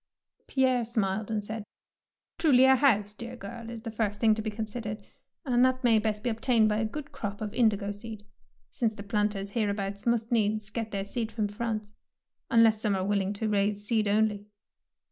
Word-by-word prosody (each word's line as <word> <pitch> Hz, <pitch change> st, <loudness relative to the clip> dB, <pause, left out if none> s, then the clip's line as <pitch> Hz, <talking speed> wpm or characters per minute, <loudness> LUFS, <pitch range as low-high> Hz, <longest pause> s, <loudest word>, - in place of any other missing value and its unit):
^ -, -, -47 dB
Pierre 255 Hz, -2 st, +2 dB
smiled 215 Hz, -3 st, -1 dB
and 215 Hz, -2 st, -1 dB
said, 220 Hz, 0 st, -5 dB, 0.3 s
— -, -, -64 dB
" -, -, -64 dB
Truly 270 Hz, -6 st, +6 dB
a 265 Hz, 0 st, +7 dB
house, 210 Hz, -7 st, +3 dB
dear 235 Hz, +3 st, -8 dB
girl, 230 Hz, +1 st, -8 dB
is 230 Hz, -1 st, -8 dB
the 225 Hz, -, -5 dB
first 210 Hz, -2 st, -2 dB
thing 220 Hz, -2 st, +5 dB
to 220 Hz, -, -2 dB
be 215 Hz, -, -2 dB
considered, 215 Hz, 0 st, -5 dB, 0.4 s
and 250 Hz, -2 st, +3 dB
that 255 Hz, 0 st, +2 dB
may 230 Hz, -3 st, +5 dB
best 210 Hz, 0 st, -2 dB
be 245 Hz, -, +1 dB
obtained 225 Hz, -1 st, +2 dB
by 210 Hz, -, +1 dB
a 220 Hz, -, 0 dB
good 285 Hz, +6 st, -6 dB
crop 205 Hz, -1 st, -5 dB
of 210 Hz, -1 st, -4 dB
in 235 Hz, -3 st, +5 dB
digo 205 Hz, -1 st, -3 dB
seed, 215 Hz, 0 st, -9 dB, 0.5 s
since 225 Hz, -3 st, -1 dB
the 200 Hz, -, -8 dB
planters 205 Hz, -1 st, -1 dB
hereabouts 200 Hz, -1 st, -2 dB
must 235 Hz, -1 st, +1 dB
needs 215 Hz, -2 st, +1 dB
get 225 Hz, -1 st, -3 dB
their 195 Hz, -2 st, -3 dB
seed 225 Hz, +2 st, -2 dB
from 215 Hz, -2 st, -1 dB
France, 215 Hz, 0 st, -4 dB, 0.6 s
unless 225 Hz, -2 st, +5 dB
some 210 Hz, -3 st, +1 dB
are 190 Hz, 0 st, -1 dB
willing 200 Hz, -1 st, +1 dB
to 215 Hz, +2 st, -3 dB
raise 205 Hz, 0 st, 0 dB
seed 215 Hz, -1 st, +1 dB
only." 210 Hz, 0 st, +1 dB
215 Hz, 205 wpm, -28 LUFS, 205-230 Hz, 0.6 s, a